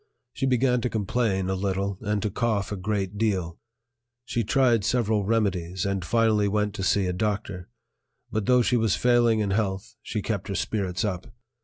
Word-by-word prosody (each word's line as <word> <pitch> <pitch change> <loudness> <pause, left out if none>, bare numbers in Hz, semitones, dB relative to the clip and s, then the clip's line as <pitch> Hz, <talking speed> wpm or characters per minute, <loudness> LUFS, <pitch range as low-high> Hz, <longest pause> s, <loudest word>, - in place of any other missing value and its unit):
She 135 - -1
began 125 -1 +2
to 125 - -1
complain 105 -3 0
a 95 - 0
little 95 0 -2
and 105 0 -1
to 105 - -1
cough 110 -3 -1
a - - -1
great 100 0 -2
deal; 95 -7 -1 0.7
she 120 - -1
tried 120 -1 +3
several 110 -2 +1
remedies, 95 -5 0
and 100 -2 -1
finally 110 +1 +2
went 105 0 0
to 100 -2 -4
see 100 0 +2
a 90 - -1
doctor; 100 -2 -3 0.6
but 110 -1 -2
though 125 -1 +5
she 125 +1 +2
was 110 -7 +2
failing 120 +2 +3
in 100 -2 -1
health, 95 -2 -2
she - - -4
kept - - -3
her - - -3
spirits 95 -1 -1
up. 95 -3 -3
105 Hz, 180 wpm, -26 LUFS, 95-115 Hz, 0.7 s, though